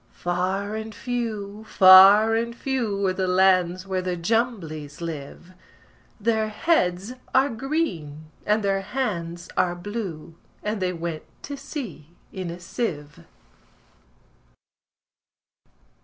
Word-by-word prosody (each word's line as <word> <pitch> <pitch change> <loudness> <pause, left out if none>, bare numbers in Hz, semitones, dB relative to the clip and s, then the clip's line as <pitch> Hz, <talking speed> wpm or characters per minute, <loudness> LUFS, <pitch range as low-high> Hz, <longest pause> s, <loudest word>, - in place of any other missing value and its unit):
Far 190 +4 -1
and 220 0 -6
few, 220 -4 -4
far 195 +3 +8
and 235 +1 -1
few, 235 -7 -1
Are 185 - +2
the 185 0 -1
lands 185 -1 +3
where 190 -1 -1
the 180 -1 -2
Jumblies 170 -7 -2
live: 165 +2 -7 0.7
Their 220 0 +1
heads 210 - 0 0.2
are 265 +2 +5
green, 185 - -3
and 210 +1 +1
their 195 -1 +1
hands 175 -7 -3
are 175 -1 +1
blue 175 -4 -6 0.3
And 210 -1 -2
they 185 -1 +1
went 170 -2 -4 0.2
to 285 - -5
sea 230 - -8 0.2
in 185 -2 -4
a 170 +1 -7
sieve. 150 - -5
195 Hz, 110 wpm, -24 LUFS, 175-225 Hz, 0.7 s, far